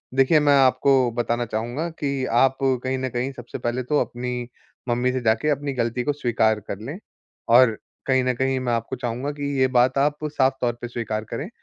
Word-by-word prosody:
देखिए, 135 +4 +5
मैं 145 -1 +4
आपको 130 -1 +3
बताना 120 0 -1
चाहूँगा 120 +9 -3
कि 140 -2 -1 0.2
आप 135 0 +3
कहीं 130 0 0
न 130 0 -2
कहीं 125 +2 -2
सबसे 120 -2 -8
पहले 120 +2 -2
तो 145 +4 +1
अपनी 125 0 -4 0.4
मम्मी 125 +1 +1
से 130 - -2
जाके 115 +5 +1
अपनी 145 -1 -1
गलती 120 0 -1
को 145 - 0
स्वीकार 110 -5 +1
कर 100 - -7
लें। 140 - -6 0.5
और 115 -2 +6 0.3
कहीं 130 -1 +3
न 125 - +1
कहीं, 130 +1 0
मैं 125 -2 -1
आपको 115 +3 -2
चाहूँगा 125 +3 -3
कि 145 -1 -3
ये 130 - +4
बात 130 +2 +3
आप 145 +1 +2
साफ़ 135 -3 +2
तौर 120 -1 +1
पे 120 - -4
स्वीकार 110 -3 -3
करें 140 - -4
130 Hz, 200 wpm, -23 LUFS, 120-135 Hz, 0.5 s, और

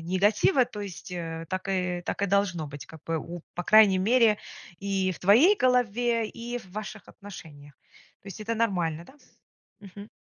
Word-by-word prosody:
негатива, 205 - +2
то 220 -4 -9
есть, 195 -3 -8
э, 165 -1 -5
так 185 +1 -4
и 180 -2 -1
так - - -3
и - - +2
должно 190 -5 0
быть. 145 0 -9
Как 160 - -13
бы 165 0 -2
у 170 +2 -8
по 175 - -4
крайней 210 -2 +6
мере 220 +1 +3 0.4
и 195 -2 -1
в - - -11
твоей 250 - +5
голове, 240 - +1
и 240 +2 -6
в 205 -6 -16
ваших 215 -1 -7
отношениях. 150 -8 -12 0.5
То 200 - -11
есть- 195 - -9
это 225 +2 -2
нормально, 175 -8 -1
да? 265 - -17 0.7
Мгм. 200 +1 -11
200 Hz, 175 wpm, -27 LUFS, 175-220 Hz, 0.7 s, крайней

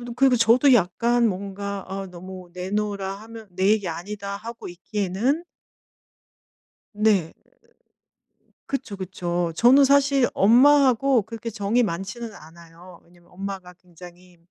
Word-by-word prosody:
그리고 260 0 +4
저도 240 +4 +5
약간 235 +4 +2
뭔가 200 0 -5
아 195 0 -5
너무 185 0 -11
내놓으라 195 +1 -3
하면 225 -1 -11
'내 185 +2 0
얘기 210 -4 0
아니다.' 200 +4 -6
하고 230 +2 -9
있기에는 205 - -2 1.5
네. 205 -6 +2 1.4
그쵸, 270 -7 -4
그쵸. 175 -2 -3
저는 255 +8 +6
사실 275 -1 +3
엄마하고 260 +1 +4
그렇게 230 +1 -7
정이 210 +3 0
많지는 195 +4 -5
않아요. 170 +1 -15
왜냐면 175 0 -24
엄마가 190 -1 -7
굉장히 180 0 -16
200 Hz, 260 characters per minute, -23 LUFS, 180-235 Hz, 1.5 s, 저는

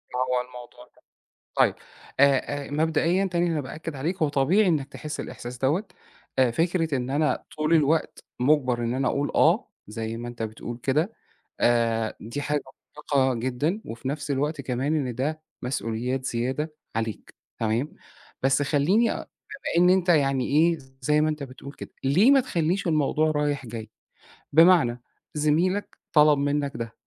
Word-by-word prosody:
هو 125 0 +1
الموضوع 125 0 -12
ده - - -25 0.6
طيب، - - +4 0.5
آآ، 140 0 +3
آآ، - - -12
مبدئيًا 160 +5 +1
تاني 175 -1 0
أنا 155 - 0
بأكِّد 155 +3 -7
عليك 160 +8 -2
هو 155 - +3
طبيعي 155 +9 +3
إنّك 150 -5 +1
تحس 150 +2 -6
الإحساس 120 +1 -7
دَوَّة 145 - +1 0.5
أ 130 -2 +5
فكرة 165 +3 0
إن 125 0 -3
أنا 150 +2 0
طول 155 +2 +2
الوقت 160 0 +1 0.2
مُجبَر 130 -2 +3
إن 115 +1 -1
أنا 130 0 +1
اقول 145 +1 -1
آه، - - +3 0.2
زي 110 +1 -4
ما 120 +1 -6
أنت 120 -1 -6
بتقول 115 +2 -6
كده 155 +10 +1 0.5
آآ، 115 -2 +2
دي 120 +6 -5
حاجة 150 0 -1 0.5
مُرهقة 130 -2 +3
جدًا، 130 - -1
وفي 115 +3 -6
نفس 145 +1 -4
الوقت 145 +2 -1
كمان 135 +4 -1
إن 130 -5 -2
ده 150 +6 -2 0.2
مسؤوليات 125 +1 -2
زيادة 130 +6 -2 0.2
عليك، 110 -1 -4 0.2
تمام، 115 +6 -1 0.5
بس 135 +2 +3
خلّيني 165 +11 +2
أ - - -3 0.4
بما 170 +1 +1
إن 180 - +6
أنت 185 -1 +2
يعني 135 -6 +3
إيه 165 +3 +3 0.2
زي 150 +3 +3
ما 155 - +3
أنت 155 -1 -3
بتقول 135 +1 -9
كده، - - -9
ليه 180 - +5
ما 275 -1 +6
تخليش 185 -5 -1
الموضوع 155 -1 +2
رايح 145 -3 -1
جاي؟ 110 -1 -7 0.6
بمعنى 160 -7 +5 0.3
زميلك 165 +7 +1 0.2
طَلَب 150 -1 +6
منّك 140 0 0
ده، 115 -1 -5
145 Hz, 160 wpm, -25 LUFS, 125-155 Hz, 0.6 s, إن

